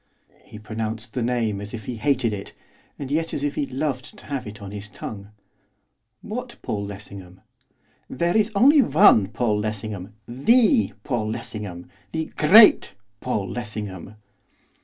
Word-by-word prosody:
He - - -12
pronounced 110 +1 -5
the 125 - -2
name 115 -4 0
as 105 +3 -6
if 110 -3 -9
he 125 - -5
hated 125 -3 +1
it, 100 -1 -7 0.4
and 140 -2 -6
yet 160 +2 -1
as 140 - -3
if 145 0 0
he 140 - -2
loved 130 -1 -4
to - - -14
have 140 -6 -4
it 105 0 -9
on 100 -2 -8
his 105 0 -7
tongue. 100 -2 -8 0.9
'What 240 +3 -6
Paul 100 -1 -3
Lessingham?' 95 -2 -9 0.7
'There 170 +8 0
is 215 0 +3
only 280 +8 +6
one 150 - +5
Paul 110 -1 0
Lessingham! 105 -2 -5
The 225 - +3
Paul 115 -5 -1
Lessingham, 105 -6 -6 0.3
the 160 -1 -3
great 205 - +7 0.2
Paul 105 -6 -2
Lessingham! 105 -2 -6
115 Hz, 150 wpm, -23 LUFS, 105-145 Hz, 0.9 s, great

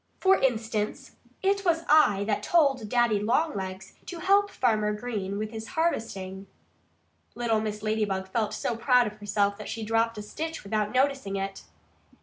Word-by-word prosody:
For 385 0 +4
instance, 225 -4 -1 0.3
it 395 +1 +2
was 335 -3 +2
I 250 -10 +5
that 210 0 -1
told 270 -6 +2
Daddy 240 -3 +3
Longlegs 200 -6 -1
to 355 - -6
help 400 +4 +3
Farmer 215 - +1
Green 210 -3 -4
with 215 +1 -3
his 220 -1 -7
harvesting." 195 - -2 0.9
Little 230 -2 +1
Mrs. 210 -1 -4
Ladybug 210 -3 -1
felt 215 +2 -1
so 235 - -2
proud 250 +1 +4
of 210 -1 -6
herself 205 -1 0
that 210 - -7
she 225 - -4
dropped 225 +1 +1
a 210 - -5
stitch 320 +9 -5
without 210 +1 -1
noticing 265 -6 +1
it. 195 0 -4
220 Hz, 155 wpm, -27 LUFS, 205-260 Hz, 0.9 s, I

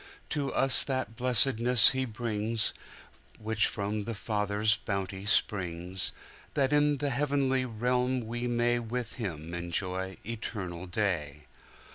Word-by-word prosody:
To 145 -3 -2
us 135 -1 +8
that 130 -5 -3
blessedness 125 -1 +4
He 130 0 -1
brings, 110 -1 -2 0.6
Which 110 0 +1
from 105 0 -3
the 115 - -4
Father's 105 0 0
bounty 100 -1 -4
springs:That 95 +8 -1
in 145 0 +3
the 140 +1 -2
heavenly 135 -1 0
realm 125 +2 -1
we 120 +2 -4
mayWith 120 0 -1
Him 85 -8 -5
enjoy 90 +2 -3
eternal 95 -6 -6
day. 85 -7 -2
110 Hz, 110 wpm, -29 LUFS, 100-125 Hz, 0.6 s, us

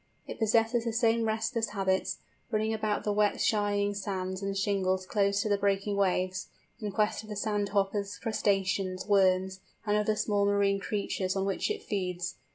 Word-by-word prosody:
It - - -8
possesses 225 +2 +2
the 230 - -1
same 230 -1 +2
restless 225 +1 -1
habits; 190 -1 0 0.3
running 220 -1 0
about 215 -1 -1
the 210 - 0
wet 210 0 +2
shining 205 -1 +1
sands 190 -1 -3
and 195 0 -2
shingles 190 -2 0
close 200 0 +1
to 215 - -2
the 205 -1 +2
breaking 200 0 +1
waves, 185 -1 0 0.3
in 210 -3 -3
quest 210 +2 +1
of 215 - -13
the 210 - -4
sand 205 -1 -1
hoppers, 200 0 0
crustaceans, 195 -3 0
worms, 190 -2 +3 0.3
and 210 -1 +2
other 210 0 +2
small 205 -1 +1
marine 200 -1 +2
creatures 195 -2 -2
on 195 0 0
which 195 - -1
it 425 0 -3
feeds. 180 -3 -2
200 Hz, 170 wpm, -29 LUFS, 195-215 Hz, 0.3 s, worms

